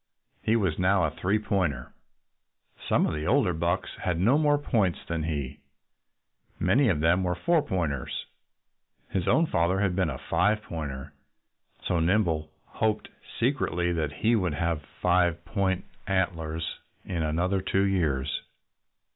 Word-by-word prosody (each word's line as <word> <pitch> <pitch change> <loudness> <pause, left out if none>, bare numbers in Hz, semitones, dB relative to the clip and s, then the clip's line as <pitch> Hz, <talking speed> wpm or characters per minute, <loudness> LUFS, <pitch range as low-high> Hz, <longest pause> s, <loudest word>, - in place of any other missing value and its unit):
He 110 - +2
was 95 -8 0
now 95 0 +3
a 80 - +1
"three 95 +7 0
pointer." 90 -11 -1 1.0
Some - - +4
of - - -1
the 75 +1 -3
older 120 -5 +3
bucks 85 +2 -1
had 90 -2 -1
no 115 +9 +4
more 145 -1 +4
points 110 - +1
than 85 -1 -2
he. 75 -5 -3 1.0
Many 135 0 +3
of 80 -6 +1
them 85 +3 +3
were 90 -1 0
but 90 - -17
"four 170 -2 +4
pointers." 85 - -2 0.9
His 95 -3 -1
own 165 - +4
father 90 - +1
had 95 -3 +1
been 95 -4 +1
a - - -4
"five 105 +3 +1
pointer." 70 -7 -6 0.7
So 85 - +1
Nimble 80 -3 +1 0.2
hoped, 110 -1 -1 0.3
secretly, 115 -9 +1
that 80 -4 -1
he 110 - +2
would 90 -8 0
have 80 0 -1 0.2
five 90 -1 +2
point 95 0 0 0.2
antlers 80 -4 -1 0.3
in 85 -3 -2
another 90 +5 0
two 95 +1 +1
years. 75 -8 0
90 Hz, 145 wpm, -27 LUFS, 80-100 Hz, 1.0 s, Some